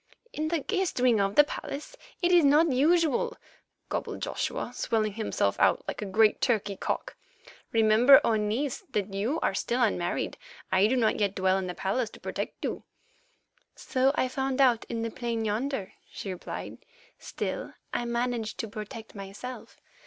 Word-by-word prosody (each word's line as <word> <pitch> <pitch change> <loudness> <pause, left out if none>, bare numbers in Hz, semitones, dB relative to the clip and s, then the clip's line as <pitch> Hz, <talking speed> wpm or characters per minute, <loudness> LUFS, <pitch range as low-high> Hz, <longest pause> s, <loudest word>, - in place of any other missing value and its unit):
"In 310 +1 -2
the 335 +1 +1
guest 380 - -1
wing 245 -3 +4
of 195 0 +1
the 295 - +8
palace? 290 0 -6 0.3
It 350 - +4
is 350 -2 +6
not 295 +3 +5
usual," 310 +2 +2 0.5
gobbled - - -3
Joshua, - - -3
swelling 215 -3 0
himself 205 - -1
out - - +3
like - - -4
a 210 - -3
great 215 +2 +3
turkey 210 -5 +1
cock. - - -3 0.6
"Remember, 225 +4 +7
O 230 - +2
niece, 220 +6 -1
that 200 -1 -1
you 225 +11 -1
are - - +1
still 235 +5 -1
unmarried. 180 -6 -1 0.3
I 190 +2 +5
do 255 - +1
not 225 -4 +2
yet 200 -2 +1
dwell 190 0 +2
in 185 - -3
the 180 - -5
palace 220 +4 -1
to - - -12
protect - - -5
you." - - -3 0.9
"So 260 0 +1
I 255 - +1
found 265 +1 -2
out 250 -4 +4
in 230 -1 -3
the 230 - -3
plain 230 -2 -2
yonder," 220 0 -2 0.2
she 195 - -5
replied; 180 - -7 0.4
"still, - - -5 0.2
I 240 - -1
managed 235 -2 -2
to 225 - -5
protect 215 +1 -8
myself. 205 +6 -8
230 Hz, 165 wpm, -28 LUFS, 210-265 Hz, 0.9 s, the